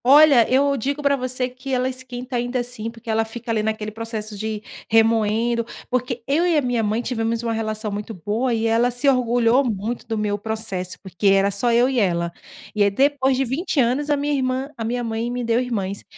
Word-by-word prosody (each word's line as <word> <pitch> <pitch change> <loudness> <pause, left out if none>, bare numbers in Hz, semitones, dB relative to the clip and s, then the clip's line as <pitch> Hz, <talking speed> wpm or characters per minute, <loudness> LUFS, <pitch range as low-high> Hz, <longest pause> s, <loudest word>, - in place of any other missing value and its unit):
Olha, 280 -3 +7
eu 280 +2 +3
digo 280 +5 -2
pra 280 0 +3
você 255 -1 -2
que 255 +2 -8
ela 255 0 +1
esquenta 255 0 -6
ainda 245 +1 -1
assim, 245 -2 -4
porque 230 +1 -15
ela 225 0 +2
fica 230 +1 -6
ali 220 -1 +1
naquele 215 0 -2
processo 220 -1 -5
de 215 +1 -4 0.3
remoendo. 225 +1 +3 0.3
Porque 250 -1 -1
eu 295 +5 +2
e 335 -3 +3
a - - +4
minha 245 -3 0
mãe 220 +2 0
tivemos 230 -1 -1
uma 230 -1 -1
relação 215 -1 -3
muito 210 +2 -5
boa 215 +7 -1
e 225 -1 0
ela 230 +2 +3
se 245 +3 -1
orgulhou 245 -1 +3
muito 225 0 -3
do 225 - -2
meu 210 -1 -1
processo, 205 -4 -4
porque 190 +1 -2
era 195 +1 +4
só 235 +5 +1
eu 240 +2 +4
e 260 -2 0
ela. 170 -4 +1 0.4
E 210 - 0
aí 200 - +5
depois 265 +3 +2
de 270 - +1
20 285 +5 -1
anos, 260 +4 +1
a 290 - +3
minha 290 +1 -1
irmã 260 +1 -1
a 230 - -5
minha 240 +2 -2
mãe 225 +1 -2
me 245 0 -3
deu 230 0 +2
irmãs. 200 -6 -3
235 Hz, 215 wpm, -22 LUFS, 220-255 Hz, 0.4 s, Olha